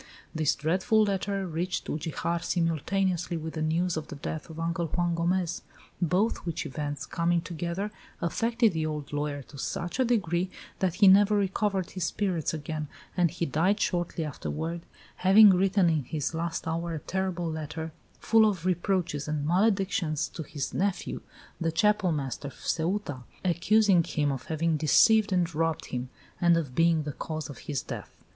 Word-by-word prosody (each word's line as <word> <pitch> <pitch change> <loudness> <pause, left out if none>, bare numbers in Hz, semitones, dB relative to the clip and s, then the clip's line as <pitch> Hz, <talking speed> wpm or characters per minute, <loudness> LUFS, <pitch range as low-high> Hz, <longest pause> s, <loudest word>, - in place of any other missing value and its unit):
This 155 -2 +1
dreadful 190 +9 +2
letter 200 -1 -1
reached 175 +2 -2
Ugijar 165 +2 -2
simultaneously 175 +1 0
with 160 0 -5
the 160 - -4
news 165 +3 +1
of 155 -1 -4
the - - -7
death 150 +3 -5
of 160 0 -8
Uncle 170 +1 -1
Juan 175 +2 0
Gomez, 175 +1 0 0.4
both 180 +6 +2
which 170 -2 -4
events, 145 +1 -4
coming 170 +1 +1
together, 170 +4 -4 0.3
affected 230 +5 +1
the 160 -1 -1
old 150 -2 -4
lawyer 145 -1 -2
to 140 +2 -13
such 175 - -3
a - - +5
degree 185 -7 +1 0.3
that 185 -3 +1
he 205 - +6
never 205 +2 +7
recovered 195 -1 0
his 185 -3 -2
spirits 180 -4 -1
again, 155 -1 -4 0.3
and 175 -2 +3
he 170 +1 -2
died 180 +8 +1
shortly 175 -3 -1
afterward, 160 +3 -4 0.3
having 200 +2 +8
written 190 0 +3
in 160 -4 +2
his 150 +3 -2
last 165 0 -3
hour 165 +1 -2
a - - -3
terrible 175 0 -2
letter, 160 +1 -5 0.3
full 220 -1 +5
of 185 -4 -4
reproaches 175 -5 0
and 150 -1 -2
maledictions, 185 -3 +1
to - - -7
his 145 -2 -4
nephew, 195 -1 -1 0.4
the 165 -1 0
Chapel 200 +2 +2
master 140 -2 -3
of 140 - -9
Ceuta, 165 -4 -2 0.3
accusing 190 +1 +4
him 145 -2 0
of 135 -2 -5
having 160 0 0
deceived 215 +8 +5
and 175 -2 +1
robbed 165 0 0
him, 125 0 -3 0.3
and 170 -1 +5
of 145 -6 -3
being 165 +1 +3
the 145 -1 -4
cause 155 -1 -5
of 140 - -11
his 145 -4 -3
death. - - -7
170 Hz, 165 wpm, -28 LUFS, 155-190 Hz, 0.4 s, having